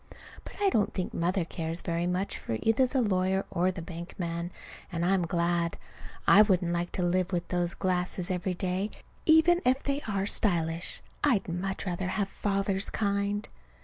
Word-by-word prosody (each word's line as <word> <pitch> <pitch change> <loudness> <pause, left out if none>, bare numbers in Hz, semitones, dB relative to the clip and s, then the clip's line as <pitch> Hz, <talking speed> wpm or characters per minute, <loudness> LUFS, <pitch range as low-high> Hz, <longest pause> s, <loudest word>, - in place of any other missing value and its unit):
But - - -10
I 405 -1 +4
don't 215 - +1
think 185 - -3
Mother 175 +1 0
cares 165 0 -4
very 170 0 -1
much 180 +2 -1
for 110 - -3
either 225 +4 +3
the 255 0 +1
lawyer 190 -1 +1
or 185 +1 +2
the 180 -3 -7
bank 170 0 -8
man, 170 -1 -3 0.4
and 170 -1 -1
I'm 180 -2 +2
glad. 170 0 0 0.5
I 205 - +9
wouldn't 180 -5 +2
like 175 0 -2
to 180 - -1
live 180 +1 +1
with 175 -2 -1
those 175 -1 0
glasses 180 0 -1
every 180 0 -1
day, 185 +3 -1 0.4
even 330 +2 +6
if 260 +2 +2
they 280 0 -1
are 195 -2 0
stylish. 170 -5 +2 0.2
I'd 250 -9 +3
much 190 +3 -3
rather 180 0 -2
have 195 +1 -1
Father's 195 -1 -1
kind. 200 0 -1
185 Hz, 175 wpm, -29 LUFS, 175-200 Hz, 0.5 s, I